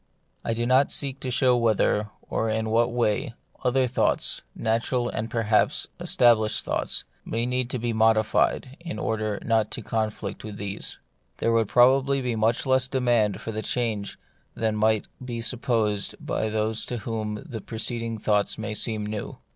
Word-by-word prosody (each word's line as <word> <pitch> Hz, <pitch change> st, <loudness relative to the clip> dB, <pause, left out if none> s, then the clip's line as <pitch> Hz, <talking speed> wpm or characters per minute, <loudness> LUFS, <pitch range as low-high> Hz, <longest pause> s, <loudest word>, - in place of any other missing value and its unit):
I 115 Hz, -, -1 dB
do 120 Hz, +1 st, -1 dB
not 130 Hz, +3 st, +4 dB
seek 135 Hz, -1 st, -1 dB
to 130 Hz, -, -4 dB
show 125 Hz, 0 st, +3 dB
whether, 110 Hz, -2 st, +2 dB, 0.2 s
or 110 Hz, -, -1 dB
in 110 Hz, 0 st, -1 dB
what 120 Hz, +2 st, +3 dB
way, 120 Hz, +1 st, 0 dB, 0.3 s
other 130 Hz, +1 st, +3 dB
thoughts, 125 Hz, 0 st, 0 dB
natural 120 Hz, +2 st, 0 dB
and 110 Hz, +1 st, -3 dB
perhaps 110 Hz, -2 st, +2 dB
established 110 Hz, -3 st, +3 dB
thoughts, -, -, 0 dB, 0.2 s
might 115 Hz, +1 st, -1 dB
need 125 Hz, -1 st, 0 dB
to 130 Hz, -, -2 dB
be 120 Hz, 0 st, -2 dB
modi 110 Hz, 0 st, +4 dB
fied 130 Hz, +5 st, 0 dB
in 170 Hz, 0 st, -6 dB
order 110 Hz, -2 st, -1 dB
not 110 Hz, -2 st, +2 dB
to 120 Hz, -, -5 dB
conflict 110 Hz, -2 st, -3 dB
with 105 Hz, -2 st, -7 dB
these. 100 Hz, -1 st, -4 dB, 0.4 s
There 115 Hz, -, +1 dB
would 115 Hz, -2 st, +3 dB
probably 135 Hz, +4 st, +4 dB
be 125 Hz, -3 st, -1 dB
much 110 Hz, +4 st, +1 dB
less 130 Hz, -1 st, +4 dB
demand 120 Hz, -6 st, +1 dB
for 110 Hz, -1 st, -4 dB
change 110 Hz, -4 st, -1 dB, 0.4 s
than 110 Hz, -1 st, 0 dB
might 110 Hz, 0 st, +2 dB, 0.2 s
be 120 Hz, -2 st, -4 dB
supposed 115 Hz, -4 st, 0 dB
by 110 Hz, -, -2 dB
those 110 Hz, +1 st, 0 dB
to 125 Hz, -, -3 dB
whom 110 Hz, -2 st, -3 dB
the 110 Hz, -3 st, -6 dB
preceding 115 Hz, +1 st, -3 dB
thoughts 105 Hz, -1 st, +1 dB
may 105 Hz, -, -4 dB
seem 110 Hz, -1 st, -1 dB
new. 105 Hz, -1 st, -5 dB
115 Hz, 165 wpm, -25 LUFS, 110-125 Hz, 0.4 s, not